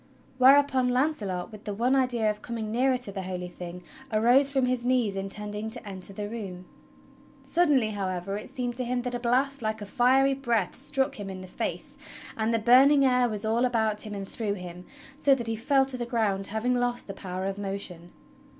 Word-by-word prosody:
Whereupon 265 Hz, -1 st, +5 dB
Launcelot, 230 Hz, -, -1 dB
with 215 Hz, -1 st, -12 dB
the 205 Hz, -, -3 dB
one 245 Hz, +5 st, +2 dB
idea 250 Hz, -4 st, +2 dB
of 210 Hz, 0 st, -9 dB
coming 225 Hz, -2 st, -5 dB
nearer 255 Hz, +3 st, +2 dB
to 245 Hz, -5 st, -2 dB
the 195 Hz, -1 st, -5 dB
Holy 180 Hz, -1 st, -5 dB
Thing, 180 Hz, 0 st, -9 dB, 0.3 s
arose 245 Hz, +6 st, +5 dB
from 270 Hz, -2 st, +1 dB
his 250 Hz, -1 st, 0 dB
knees 245 Hz, -5 st, +1 dB
intending 210 Hz, +2 st, -4 dB
to 235 Hz, -1 st, -5 dB
enter 190 Hz, -1 st, -4 dB
the 205 Hz, +1 st, -5 dB
room. 195 Hz, -5 st, -7 dB, 0.8 s
Suddenly, 290 Hz, -10 st, +2 dB
however, 195 Hz, -1 st, -3 dB
it 210 Hz, -, -7 dB
seemed 250 Hz, -2 st, -3 dB
to 255 Hz, -, -1 dB
him 245 Hz, 0 st, -2 dB
that 250 Hz, -1 st, -3 dB
a 245 Hz, -, -2 dB
blast 260 Hz, +3 st, +1 dB
like 220 Hz, 0 st, -2 dB
a 205 Hz, -, -6 dB
fiery 260 Hz, +5 st, +3 dB
breath 235 Hz, -8 st, -1 dB
struck 270 Hz, -1 st, 0 dB
him 200 Hz, -1 st, -5 dB
in 190 Hz, -1 st, -7 dB
the 185 Hz, -, -9 dB
face, -, -, -4 dB, 0.4 s
and 220 Hz, 0 st, 0 dB
the 230 Hz, -, +2 dB
burning 265 Hz, +5 st, +6 dB
air 250 Hz, -1 st, +3 dB
was 210 Hz, -1 st, -3 dB
all 225 Hz, +3 st, +1 dB
about 220 Hz, -4 st, +1 dB
him 210 Hz, -2 st, -5 dB
and 195 Hz, -1 st, -5 dB
through 210 Hz, -1 st, -2 dB
him, 180 Hz, -1 st, -9 dB, 0.3 s
so 280 Hz, -2 st, +4 dB
that 240 Hz, -3 st, -5 dB
he 225 Hz, 0 st, -2 dB
fell 270 Hz, +4 st, +2 dB
to 265 Hz, -1 st, -2 dB
the 240 Hz, -1 st, -4 dB
ground, 205 Hz, -5 st, 0 dB
having 220 Hz, +4 st, 0 dB
lost 245 Hz, 0 st, 0 dB
the 195 Hz, -, -7 dB
power 185 Hz, -1 st, -5 dB
of 195 Hz, +1 st, -3 dB
motion. 195 Hz, -4 st, -5 dB
225 Hz, 205 wpm, -27 LUFS, 200-255 Hz, 0.8 s, burning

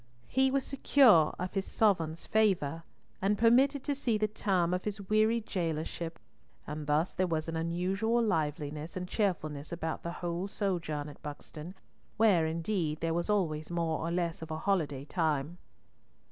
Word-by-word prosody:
He 265 Hz, +1 st, +3 dB
was 270 Hz, 0 st, +1 dB
secure 255 Hz, -, +5 dB
of 180 Hz, +1 st, -4 dB
his 195 Hz, -1 st, -2 dB
sovereign's 165 Hz, -7 st, +1 dB
favour, 180 Hz, -8 st, +2 dB, 0.4 s
and 200 Hz, +2 st, +2 dB
permitted 260 Hz, +5 st, +4 dB
to 290 Hz, -, 0 dB
see 245 Hz, -5 st, 0 dB
the 215 Hz, 0 st, +1 dB
term 190 Hz, -5 st, 0 dB
of 180 Hz, -, -1 dB
his 210 Hz, -1 st, -3 dB
weary 215 Hz, +2 st, +3 dB
jailorship, 165 Hz, -4 st, -3 dB, 0.5 s
and 150 Hz, 0 st, -5 dB
thus 150 Hz, +4 st, +1 dB
there 185 Hz, 0 st, +1 dB
was 160 Hz, -2 st, -1 dB
an 165 Hz, -, -3 dB
unusual 185 Hz, +8 st, 0 dB
liveliness 150 Hz, -4 st, -2 dB
and 180 Hz, 0 st, -4 dB
cheerfulness 155 Hz, -8 st, -2 dB
about 165 Hz, -2 st, -3 dB
the 170 Hz, -, -4 dB
whole 175 Hz, +2 st, -3 dB
sojourn 170 Hz, -8 st, -2 dB
at 145 Hz, -, -11 dB
Buxton, 150 Hz, +3 st, -8 dB, 0.4 s
where, 195 Hz, -8 st, +4 dB
indeed, 165 Hz, -1 st, -1 dB
there 165 Hz, 0 st, -1 dB
was 170 Hz, +4 st, -1 dB
always 160 Hz, -7 st, 0 dB
more 165 Hz, -2 st, -1 dB
or 165 Hz, -, -2 dB
less 170 Hz, -1 st, -1 dB
of 160 Hz, -, -7 dB
a 155 Hz, -, -3 dB
holiday 155 Hz, -7 st, 0 dB
time. 160 Hz, 0 st, -1 dB
170 Hz, 160 wpm, -31 LUFS, 160-205 Hz, 0.5 s, secure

